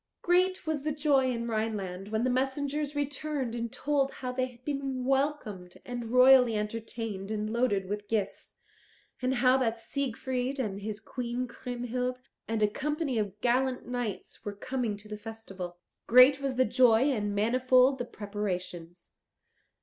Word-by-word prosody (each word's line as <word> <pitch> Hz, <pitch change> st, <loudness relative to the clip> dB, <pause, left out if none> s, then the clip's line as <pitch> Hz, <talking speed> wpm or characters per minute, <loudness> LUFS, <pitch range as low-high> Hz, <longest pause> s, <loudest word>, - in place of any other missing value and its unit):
Great 365 Hz, +1 st, +2 dB
was 315 Hz, -2 st, -1 dB
the 305 Hz, +2 st, -1 dB
joy 285 Hz, -3 st, +2 dB
in 235 Hz, -1 st, -3 dB
Rhineland 210 Hz, -4 st, -2 dB
when 220 Hz, +2 st, -1 dB
the 255 Hz, -, +2 dB
messengers 280 Hz, +3 st, -1 dB
returned 285 Hz, -3 st, -2 dB
and 235 Hz, -1 st, -3 dB
told 280 Hz, -2 st, 0 dB
how 250 Hz, -1 st, -4 dB
they 255 Hz, 0 st, -1 dB
had 250 Hz, 0 st, -18 dB
been 275 Hz, -3 st, -2 dB
welcomed 265 Hz, -10 st, -1 dB
and 245 Hz, -1 st, -5 dB
royally 250 Hz, -2 st, +6 dB
entertained 210 Hz, -2 st, -4 dB
and 215 Hz, 0 st, -2 dB
loaded 205 Hz, -6 st, +1 dB
with 205 Hz, +1 st, -4 dB
gifts, 210 Hz, -3 st, -2 dB, 0.7 s
and 255 Hz, +1 st, +1 dB
how 255 Hz, +1 st, +4 dB
that 230 Hz, -3 st, 0 dB
Siegfried 260 Hz, +1 st, -2 dB
and 205 Hz, -6 st, -3 dB
his 210 Hz, 0 st, -4 dB
Queen 245 Hz, +2 st, -4 dB
Kriemhild 250 Hz, +1 st, -4 dB, 0.2 s
and 225 Hz, -1 st, 0 dB
a -, -, +6 dB
company 290 Hz, +2 st, -1 dB
of 205 Hz, -1 st, -3 dB
gallant 255 Hz, +1 st, +1 dB
knights 245 Hz, -4 st, -4 dB
were 205 Hz, -1 st, -5 dB
coming 235 Hz, -1 st, -2 dB
to 210 Hz, +1 st, -12 dB
the 210 Hz, 0 st, -6 dB
festival. 195 Hz, -5 st, -7 dB, 0.3 s
Great 255 Hz, +3 st, +7 dB
was 270 Hz, -2 st, -1 dB
the 255 Hz, +1 st, +4 dB
joy 250 Hz, +3 st, +4 dB
and 205 Hz, -5 st, -1 dB
manifold 255 Hz, +4 st, +4 dB
the 245 Hz, -, -2 dB
preparations. 180 Hz, -4 st, -5 dB
245 Hz, 155 wpm, -29 LUFS, 215-265 Hz, 0.7 s, Great